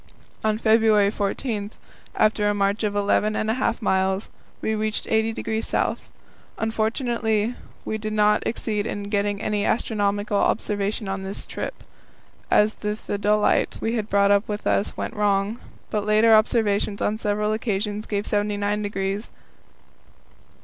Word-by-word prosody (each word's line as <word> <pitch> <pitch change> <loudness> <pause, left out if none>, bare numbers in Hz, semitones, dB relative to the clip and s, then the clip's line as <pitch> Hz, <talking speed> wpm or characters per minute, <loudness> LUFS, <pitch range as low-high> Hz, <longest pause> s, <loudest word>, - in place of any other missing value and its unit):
On 215 -1 +1
February 220 -2 +4
14, 205 0 -2 0.5
after 215 -1 +2
a 205 - +1
march 200 +2 +1
of 205 -1 0
eleven 205 +1 +2
and 215 - 0
a 255 +3 -2
half 245 - 0
miles, 190 0 +1 0.3
we 220 - -1
reached 215 0 -1
80° 220 0 -1
S. - - +1 0.6
Unfortunately 225 0 0 0.3
we 220 - -2
did 215 0 -4
not 210 0 +3
succeed 215 -2 -2
in 205 - -4
getting 205 -1 0
any 210 -1 0
astronomical 205 -2 0
observation 205 0 0
on 195 0 -3
this 190 +1 -5
trip, - - -6 0.7
as 210 +1 +4
the 210 0 -3
theodolite 210 0 +1
we 225 - -1
had 220 -2 -2
brought 200 0 +4 0.2
with 210 0 -4
us 200 - 0
went - - -3
wrong, 205 +2 +1 0.3
but 210 -1 0
later 215 +2 +5
observations 215 -2 +2
on 215 +1 0
several 210 0 0
occasions 210 -1 -2
gave 205 -1 -1
79° 205 0 0
59' 195 -1 -2
S. 210 - -10
210 Hz, 140 wpm, -24 LUFS, 205-220 Hz, 0.7 s, later